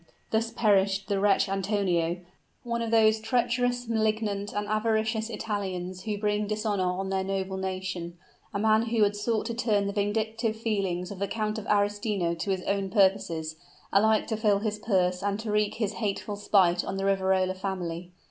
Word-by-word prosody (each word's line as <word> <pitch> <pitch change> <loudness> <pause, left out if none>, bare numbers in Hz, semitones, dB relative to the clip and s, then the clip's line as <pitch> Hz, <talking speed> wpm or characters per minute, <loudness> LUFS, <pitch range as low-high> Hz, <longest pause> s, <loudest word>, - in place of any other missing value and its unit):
Thus 225 +1 +1
perished 195 -4 +2
the 200 -1 +1
wretch 200 0 +3
Antonio 185 -3 0 0.4
one 235 -1 -2
of 230 - -2
those 220 -1 +4
treacherous, 245 +1 0
malignant, 215 -2 0
and 205 0 -3
avaricious 220 +1 0
Italians 185 -5 -4
who 210 -2 -2
bring 210 0 0
dishonor 210 -2 0
on 190 +1 -3
their 190 0 0
noble 190 0 -2
nation, 185 -2 -4 0.3
a - - -2
man 220 +2 +3
who 225 -1 +2
had 205 0 +2
sought 215 +1 -1
to 235 - -2
turn 220 -4 +1
the 200 - -2
vindictive 220 +2 -1
feelings 195 -5 -1
of 200 - -7
the 200 - 0
Count 215 +1 -2
of 220 - -9
Arestino 205 -3 +1
to 170 +4 -4
his 190 -1 0
own 200 -1 -1
purposes, 185 -5 +1 0.4
alike 215 +2 +4
to 220 - -2
fill 210 -2 +3
his 210 0 -2
purse 185 -4 +1
and 200 +1 -1
to 220 -2 -3
wreak 210 -1 +1
his 215 -2 -1
hateful 205 -1 -3
spite 185 -4 +3
on 195 - -4
the 195 - -1
Riverola 190 -1 +2
family! 180 -3 -4
205 Hz, 175 wpm, -28 LUFS, 190-220 Hz, 0.4 s, those